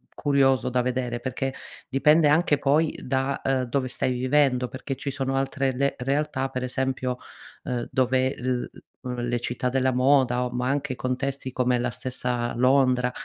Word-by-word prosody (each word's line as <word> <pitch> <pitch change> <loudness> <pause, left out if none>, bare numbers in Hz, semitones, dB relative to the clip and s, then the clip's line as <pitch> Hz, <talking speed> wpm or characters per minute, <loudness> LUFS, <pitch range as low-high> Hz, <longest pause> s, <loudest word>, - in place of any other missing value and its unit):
curioso 135 -3 +2
da 125 0 +1
vedere, 125 -1 -2
perché 130 +2 -3 0.3
dipende 150 +4 +4
anche 150 0 +3
poi 150 +3 +1
da, 135 +1 -1
uhm, 135 -1 +1
dove 130 +2 -1
stai 130 0 -1
vivendo. 125 0 +2
Perché 130 +2 -5
ci 140 - -4
sono 135 -1 -2
altre 135 0 0
le 140 +2 0
realtà, 135 +1 -1
per 130 -1 -4
esempio, 130 0 -2 0.5
uhm, 120 -1 -3
dove 130 +1 +1
l 125 0 -1 0.4
l 125 -1 -3
le 120 0 0
città 125 +1 -2
della 130 +1 +1
moda 125 -1 +3
o - - -3
ma 125 +1 -1
anche 140 -2 -1
contesti 130 +1 -3
come 125 0 +1
la 120 +1 -1
stessa 125 -1 -2
Londra 125 0 +3
130 Hz, 165 wpm, -25 LUFS, 125-135 Hz, 0.5 s, dipende